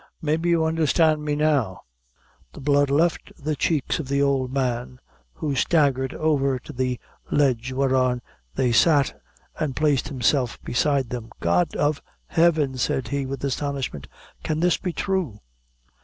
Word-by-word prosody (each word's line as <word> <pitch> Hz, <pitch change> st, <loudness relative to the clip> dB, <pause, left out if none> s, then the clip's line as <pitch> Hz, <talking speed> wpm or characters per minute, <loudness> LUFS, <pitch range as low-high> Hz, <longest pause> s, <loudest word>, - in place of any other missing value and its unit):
Maybe 160 Hz, +3 st, 0 dB
you 165 Hz, -2 st, +3 dB
understand 160 Hz, -1 st, +2 dB
me 150 Hz, -1 st, -1 dB
now?" 140 Hz, -, +1 dB, 0.7 s
The -, -, -10 dB
blood 145 Hz, 0 st, +2 dB
left 160 Hz, +5 st, +1 dB
the 150 Hz, +1 st, -2 dB
cheeks 150 Hz, 0 st, 0 dB
of 150 Hz, -, -4 dB
the 140 Hz, +1 st, 0 dB
old 135 Hz, -2 st, +1 dB
man, 125 Hz, -2 st, -2 dB, 0.3 s
who 150 Hz, -3 st, -3 dB
staggered 135 Hz, -2 st, +2 dB
over 140 Hz, -4 st, +1 dB
to 125 Hz, -, -11 dB
the 125 Hz, -1 st, -1 dB, 0.3 s
ledge 130 Hz, -3 st, +1 dB
whereon 130 Hz, -2 st, +1 dB, 0.3 s
they 125 Hz, -2 st, +1 dB
sat, 145 Hz, +2 st, +3 dB, 0.4 s
and 145 Hz, -4 st, -1 dB
placed 145 Hz, -3 st, +1 dB
himself 130 Hz, -2 st, 0 dB
beside 135 Hz, 0 st, 0 dB
them. 120 Hz, -2 st, -5 dB
"God 85 Hz, +1 st, +1 dB
of 145 Hz, 0 st, 0 dB, 0.2 s
Heaven!" 160 Hz, -6 st, +2 dB
said 125 Hz, +3 st, -1 dB
he, 140 Hz, -1 st, -2 dB
with 135 Hz, +1 st, -5 dB
astonishment, 140 Hz, -, -3 dB, 0.3 s
"can 155 Hz, 0 st, -2 dB
this 175 Hz, 0 st, +3 dB
be 180 Hz, -, -3 dB
thrue?" 175 Hz, -, -2 dB
140 Hz, 145 wpm, -24 LUFS, 130-155 Hz, 0.7 s, you